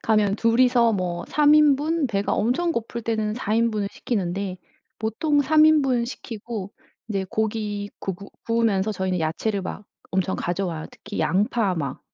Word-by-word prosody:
가면 210 -2 +2
둘이서 235 +1 +4
뭐 175 -2 -2
3 300 0 +5
인분, 300 +1 +3
배가 200 -4 -1
엄청 265 +11 +1
고플 235 -2 -4
때는 215 -1 -1
4 220 -3 -2
인분을 220 -3 +1
시키는데. 195 -4 -3 0.4
보통 290 +7 +1
3 310 +2 +5
인분 270 -6 +3
시키고 225 -4 -6 0.4
이제 195 -3 -2
고기 210 -1 -2
구 190 - -3
구 200 +3 -12 0.2
구우면서 220 -3 +1
저희는 185 -2 -1
야채를 175 +6 -1
막 190 +2 -6 0.3
엄청 190 0 0
가져와요. 175 -3 -3
특히 205 0 -8
양파 200 +2 +1
막 140 -5 -4
215 Hz, 285 characters per minute, -24 LUFS, 195-240 Hz, 0.4 s, 3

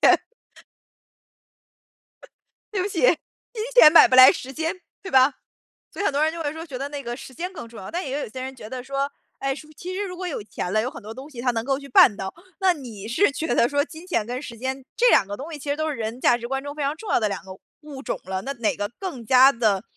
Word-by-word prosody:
金 - - +7
钱 - - +5 2.5
对 400 -3 -1
不 380 - -1
起， 375 -4 -4
金 - - 0
钱 310 -11 +9
买 335 - +9
不 255 - +2
来 255 0 +10
时 265 +1 -7
间， 320 +2 -1 0.3
对 380 - -7
吧？ 265 +1 +5 0.6
所 - - -6
以 405 - -1
很 - - +1
多 290 +2 +2
人 315 - +2
就 335 0 -6
会 290 -1 -2
说， 320 +1 -7
觉 275 -6 -7
得 275 +2 -3
那 285 -1 -6
个 240 +1 -5
时 265 - -11
间 355 +6 -5
更 310 -10 -8
重 230 -1 -13
要。 190 - -8
但 350 - -2
也 270 +1 -3
有 - - -5
些 255 +3 -7
人 265 +1 -6
觉 215 -4 -10
得 255 -1 -5
说， 275 +2 -2 0.3
哎， 275 0 -1
是 300 +2 -11
不 310 - -17
是 - - -47
其 365 +1 -6
实 400 +2 -2
如 365 -2 -7
果 365 +1 -6
有 335 -10 -3
钱 185 -3 -5
了， 215 +2 +2
有 245 - -2
很 280 - -11
多 220 - -8
东 265 +5 -10
西 245 -5 -8
它 250 0 +2
能 225 -1 -3
够 270 0 +1
去 280 0 -11
办 240 -4 +7
到， 190 -1 -5 0.3
那 380 -1 +5
你 225 - -9
是 325 +13 +3
觉 315 -2 -2
得 235 - +4
说 285 +1 +1
金 325 +3 -12
钱 285 - 0
跟 250 +3 -4
时 235 -5 -9
间， 260 +2 -4
这 - - +4
2 195 - +5
个 205 - -4
东 285 +9 -8
西 305 - -7
其 285 - -7
实 285 - +1
都 315 0 -1
是 300 - -3
人 225 +2 -4
价 240 - +4
值 235 0 -6
观 270 +1 -2
中 285 0 -6
非 300 - -5
常 285 +1 0
重 420 +5 -6
要 - - +4
的 215 - +1
2 200 - -4
个 190 - -11 0.3
物 295 -3 -9
种 - - -3
了， 190 +1 -4
那 275 - -3
哪 235 -5 0
个 205 0 -2
更 335 - -6
加 260 +3 +7
地 215 -6 +1
270 Hz, 300 characters per minute, -24 LUFS, 235-315 Hz, 2.5 s, 来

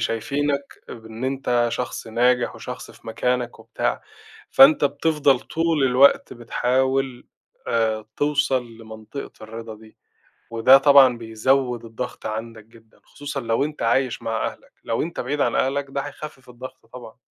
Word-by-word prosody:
شايفينك 140 +5 -2
بإن 110 +1 -8
أنت 130 -3 0
شخص 125 - -4
ناجح، 120 +2 +1
وشخص - - -8
في - - -19
مكانك 125 +2 -2
وبتاع، - - -3 0.5
فأنت 280 +2 +7
بتفضل 150 -5 +2
طول 165 -3 0
الوقت 130 +2 +4
بتحاول 130 +2 -1 0.4
آآ، 110 -2 0
توصل 145 -4 +1
لمنطقة 110 +4 -9
الرِضا 115 0 -8
دي، 110 0 -17 0.5
وده 115 +4 +6
طبعًا 135 -3 +6
بيزوّد 120 +2 0
الضغط 115 +2 -7
عندك 110 0 -6
جدًا، 110 0 -22
خصوصًا 145 -1 -6
لو 115 +3 0
أنت 150 0 -6
عايش 120 +2 +1
مع 115 -1 -2
أهلك، - - -9
لو 115 - -1
أنت 170 - -4
بعيد 140 +4 -3
عن - - +1
أهلك 140 +1 0
ده 140 - -2
هيخفِّف 145 -2 -9
الضغط 125 -1 -11
طبعًا. 125 -3 -11
125 Hz, 140 wpm, -22 LUFS, 115-140 Hz, 0.5 s, فأنت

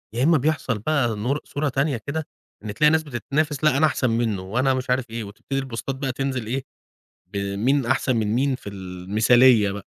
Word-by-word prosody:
يا 125 - +1
إما 160 +1 +5
بيحصل 140 -5 -1
بقى 120 -2 0
نور 125 +8 -1
صورة 145 +1 -2
تانية 135 0 0
كده 155 +1 -3 0.4
إن 105 -1 -5
تلاقي 150 +4 +4
ناس 160 0 +2
بتتنافس، 145 +2 -2
لأ، 150 -3 +4
أنا 155 - +4
أحسن 130 -4 +1
منه، 115 -4 0
وأنا 125 +8 +1
مش 130 -1 -3
عارف 125 -1 0
إيه. 115 0 -4
وتبتدي 105 +7 -5
البوستات 135 0 -4
بقى 135 -1 -2
تنزل 130 -2 -3
إيه، 130 +3 -2 0.7
بمين 105 +7 0
أحسن 130 0 +1
من 110 -2 0
مين 135 +2 +1
في 100 - -10
المثالية 100 +5 +3
بقى. 100 0 -8
130 Hz, 190 wpm, -23 LUFS, 110-140 Hz, 0.7 s, إما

